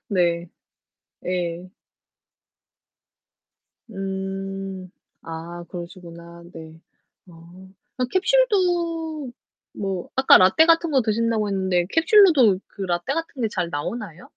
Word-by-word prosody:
네. 175 -3 +1 0.8
예. 180 0 -3 2.2
음 195 -1 -5 0.3
아, 165 +1 -8
그러시구나. 170 -1 -10
네. 160 0 -11 0.5
어. 175 +2 -15 0.3
어 250 - +1
캡슐도 345 - 0 0.4
뭐 195 -3 -4
아까 265 0 +7
라테 190 - +5
같은 330 0 +3
거 265 -4 +3
드신다고 220 -1 0
했는데 190 -3 0
캡슐로도 325 - +5
그 200 - -9
라테 175 +7 -2
같은 325 -6 -5
게 220 - +1
잘 180 -4 -3
나오나요? 180 +4 -6
195 Hz, 190 characters per minute, -23 LUFS, 175-265 Hz, 2.2 s, 아까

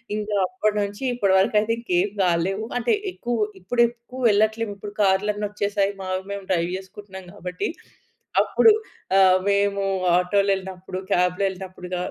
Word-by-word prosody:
ఇంకా 210 -1 -2
అప్పటి 215 -3 -1
నుంచి 205 +5 -4
ఇప్పటి 200 -6 +2
వరకు 205 +3 +2
అయితే 215 +2 -1
ఇంకేం 195 -4 0
కాలేవు. 185 +4 +1
అంటే 240 -1 +1 0.2
ఎక్కు 240 -7 -4 0.3
ఇప్పుడు 240 +6 0
ఎక్కువ 240 +2 -11
వెళ్ళట్లేము. 215 +1 +1
ఇప్పుడు 205 +1 -8
కార్‌లన్నీ 205 +2 +2
వచ్చేసాయి. 205 -1 -1 0.4
మేము 200 -1 -5
డ్రైవ్ 170 -1 +1
చేసుకుంటున్నాం 190 0 -11
కాబట్టి, 180 -2 -4 0.7
అప్పుడు 445 -2 +5 0.5
ఆహ్, 185 -1 +6
మేము 200 0 +1 0.3
ఆటో‌లో 200 +2 +2
ఎళ్ళినప్పుడు, 185 0 -7
కాబ్‌లో 180 +2 +2
ఎళ్ళినప్పుడు 185 -1 -9
క - - -2
200 Hz, 140 wpm, -23 LUFS, 185-210 Hz, 0.7 s, ఆహ్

